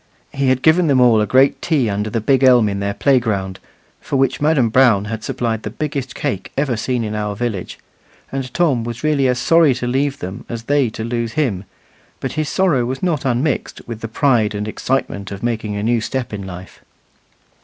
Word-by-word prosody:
He 135 -1 0
had 130 0 +1
given 165 +2 +4
them 135 -3 +3
all 120 -3 +5
a 105 - 0
great 135 +2 +3
tea 150 -8 +1
under 105 +1 -2
the 115 - -1
big 135 +4 +2
elm 125 -4 +6
in 100 -1 -2
their 100 0 -2
playground, 105 -8 +1 0.4
for - - -4
which 135 +1 +1
Madam 145 -6 +3
Brown 110 -4 +4
had 110 0 -5
supplied 120 -4 -2
the 105 - -5
biggest 140 +1 -4
cake 115 -10 -3
ever 140 -3 +1
seen 120 +2 -1
in 105 -1 -4
our 105 -1 -2
village; 110 -5 -4 0.5
and 135 -2 -4
Tom 140 -7 +1
was 120 +2 -6
really 150 -3 +2
as 125 -1 +1
sorry 160 0 +4
to 125 - -4
leave 135 +3 0
them 95 +2 -7
as 115 -1 -5
they 140 -1 +2
to 110 - -6
lose 115 -1 -2
him, 115 -11 -1 0.5
but - - -3
his 155 0 -2
sorrow 175 -10 +2
was 130 +6 -4
not 165 -6 0
unmixed 130 +3 -1
with 115 -2 -7
the 115 - -4
pride 115 -4 +1
and 105 +1 -3
excitement 110 -4 -2
of 100 +1 -8
making 110 -3 -2
a 100 - -3
new 115 +1 +1
step 125 +1 -3
in 100 -2 -5
life. 90 0 -10
120 Hz, 210 wpm, -19 LUFS, 110-135 Hz, 0.5 s, elm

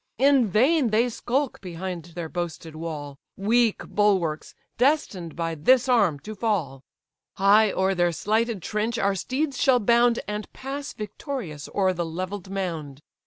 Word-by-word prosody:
In 270 -1 +4
vain 260 - +3
they 225 +3 +2
skulk 260 +3 -2
behind 180 -2 -5
their 170 -2 -4
boasted 165 -2 -5
wall, 150 -4 -6 0.2
Weak 225 +2 +2
bulwarks; 190 -7 0 0.2
destined 245 - +1
by 165 -1 -2
this 250 - +3
arm 205 - +3
to 215 - -7
fall. 190 - -2 0.5
High 205 +2 +5
o'er 190 +1 +1
their 175 -1 +2
slighted 220 +2 -1
trench 220 +3 -1
our 200 -2 +2
steeds 265 - -2
shall 260 -3 +5
bound, 235 +1 +3
And 210 0 -5
pass 275 +2 -6
victorious 210 - -6
o'er 190 -2 +2
the 175 -1 -2
levell'd 185 +3 -5
mound. 160 -7 -4
200 Hz, 145 wpm, -25 LUFS, 170-240 Hz, 0.5 s, High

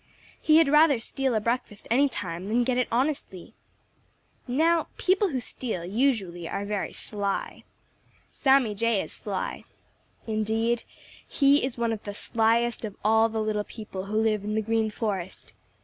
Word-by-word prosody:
He 310 0 +5
had 325 -2 +5
rather 300 -2 +5
steal 265 +1 -2
a - - +3
breakfast 230 -2 -3
any 275 +4 +4
time 185 -5 -4
than 235 +3 +2
get 250 0 0
it 250 - +1
honestly. 245 - -2 0.9
Now 320 +6 +2
people 385 +3 +2
who 265 -5 -2
steal 225 -7 -5
usually 195 -6 0
are 200 - -3
very 205 -1 -2
sly. 200 -2 -3 0.7
Sammy 265 -5 +3
Jay 225 -1 +1
is - - -9
sly. - - -4 0.6
Indeed, 225 +2 0 0.4
he 280 0 +3
is 260 -2 -3
one 235 -1 0
of 215 - -5
the 205 -1 -6
slyest 230 +2 +1
of 210 -3 -5
all 220 +1 +4
the 220 -1 -2
little 215 -1 -1
people 205 -4 -7
who 210 +2 -2
live 215 -2 +1
in 210 +1 -2
the 220 - 0
Green 225 0 +1
Forest. 200 -4 -4
225 Hz, 160 wpm, -26 LUFS, 210-255 Hz, 0.9 s, He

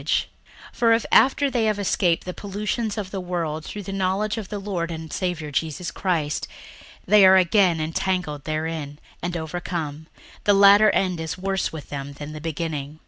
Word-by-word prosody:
61:002:020 - - +1 0.5
For 230 -1 +3
if 225 0 +1
after 275 +1 +4
they 235 -3 +1
have 215 -1 +1
escaped 180 -4 +1
the 180 - -4
pollutions 210 +3 -3
of 195 -3 -4
the 195 - -3
world 165 -4 -3
through 205 +5 -7
the 195 - -6
knowledge 195 +2 0
of 205 - -8
the 210 - -4
Lord 190 -4 -3
and 160 -2 -6
Saviour 175 -5 -3
Jesus 165 +3 -2
Christ, 165 -5 -1 0.6
they 210 0 +6
are 190 0 +8
again 185 -2 +3
entangled 160 -2 -2
therein, 155 -2 -3 0.2
and 175 0 -2
overcome, 160 -2 -4 0.4
the 205 - +4
latter 200 +2 +7
end 185 -4 +1
is 160 +1 -4
worse 195 0 -1
with 160 -3 -9
them 140 0 -5
than 145 +1 -8
the 150 - -8
beginning. 155 -2 -4
180 Hz, 180 wpm, -23 LUFS, 160-200 Hz, 0.6 s, are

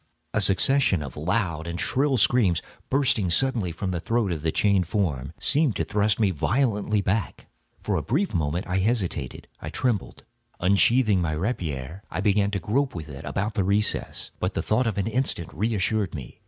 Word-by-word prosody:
A - - +2
succession 95 - +3
of 70 -3 -8
loud 85 0 -1
and 85 0 -4
shrill 135 0 +1
screams, 100 -4 +3 0.3
bursting 125 -8 +2
suddenly 115 -2 +1
from 95 +3 -3
the 90 - -2
throat 115 +1 0
of 80 -3 -3
the 80 +1 0
chained 100 -2 +2
form, 80 - -1
seemed 145 -5 +2
to - - 0
thrust 105 +1 +1
me 105 -4 +3
violently 105 - +1
back. 100 +1 -2 0.4
For - - 0
a - - 0
brief 155 - 0
moment 80 +1 -1
I 90 0 0
hesitated—I 95 - -2
trembled. 120 -6 -2 0.4
Unsheathing 100 +2 +3
my 80 -2 -1
rapier, 80 - -3
I 80 - -4
began 100 0 +2
to 100 -1 -2
grope 130 +9 0
with 80 -2 -6
it 70 -1 -8
about 105 +3 -2
the 100 - 0
recess; 100 +3 -1
but - - -2
the - - -1
thought 115 +3 +1
of 110 - -2
an 100 - 0
instant 115 -7 -2
reassured 105 0 0
me. 65 -5 -9
100 Hz, 180 wpm, -25 LUFS, 85-115 Hz, 0.4 s, succession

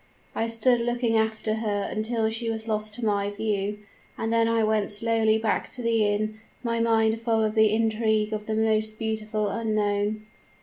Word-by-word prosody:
"I 225 - -1
stood 235 +1 +2
looking 240 -1 0
after 220 0 0
her 205 -2 -1
until 220 +1 -1
she 225 +1 -3
was 220 0 -4
lost 215 -1 -2
to 240 - -4
my 200 -1 +1
view; 205 -1 -2 0.4
and 225 0 -1
then 230 0 +3
I 230 -1 +2
went 215 -1 +1
slowly 220 +1 +2
back 220 -1 -1
to 250 - -6
the 230 -1 +2
inn, 215 +1 -1 0.2
my 230 -1 -1
mind 225 -1 +2
full 225 -1 +1
of 215 -1 0
the 220 -1 +5
image 220 0 +1
of 215 -1 -4
the 220 0 +1
beautiful 215 -1 -2
unknown. 215 -1 -1
220 Hz, 175 wpm, -26 LUFS, 215-225 Hz, 0.4 s, the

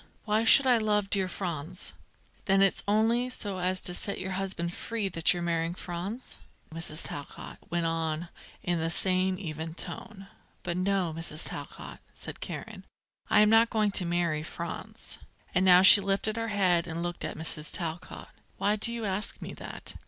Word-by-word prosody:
Why 215 +1 +1
should 270 +4 +7
I 250 -3 +4
love 210 -2 0
dear 195 -2 +2
Franz?" 175 -1 -4 0.5
"Then 195 0 +4
it's 195 - +3
only 225 +4 +2
so 205 -6 -2
as 185 +1 -1
to 180 - +1
set 200 +2 -2
your 190 0 -4
husband 185 -2 -3
free 220 -1 -3
that 165 -2 +3
you're 175 -1 -2
marrying 170 0 -1
Franz?" 190 +8 -6 0.4
Mrs. 165 -1 -5
Talcott 145 - -8
went 170 -1 -1
on 165 0 -2 0.3
in 175 -1 0
the 165 0 0
same 185 +1 +3
even 160 -3 -6
voice. 180 +5 -6 0.5
"But 175 0 -3
no, 185 -3 0
Mrs. 165 -1 -4
Talcott," - - -7 0.2
said - - -6
Karen, - - -7 0.5
"I 210 - +5
am 210 - +5
not 225 +1 +5
going 215 -2 +1
to 190 -2 +1
marry 170 -3 0
Franz." 170 +1 -5 0.3
And 180 - +3
now 180 -1 +7
she 200 +2 +11
lifted 200 +2 -1
her 230 0 -2
head 185 -5 +2
and 165 +1 -4
looked 175 0 -4
at - - -5
Mrs. 160 -1 0
Talcott. 170 -2 -5 0.3
"Why 210 +1 +1
do 225 +2 +1
you 235 -2 -4
ask 200 +1 +3
me - - -7
that? - - -6
185 Hz, 175 wpm, -28 LUFS, 170-205 Hz, 0.5 s, she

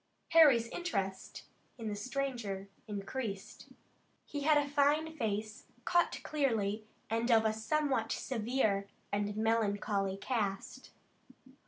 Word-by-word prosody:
Harry's 290 -8 +7
interest 195 - -3 0.3
in 225 -2 -5
the 210 - -2
stranger 235 -5 -3 0.2
increased. 205 0 -5 0.6
He 290 - -5
had 300 +1 +5
a 290 -1 +2
fine 295 +3 +2
face, 215 -4 -3 0.2
cut 350 0 +2
clearly, 225 -8 0 0.3
and 230 +2 +1
of 225 -2 +5
a 220 - +3
somewhat 235 +1 0
severe 220 -5 0 0.2
and 205 0 -1
melancholy 205 -3 +1
cast. 200 -4 -3
225 Hz, 110 wpm, -33 LUFS, 205-275 Hz, 0.6 s, Harry's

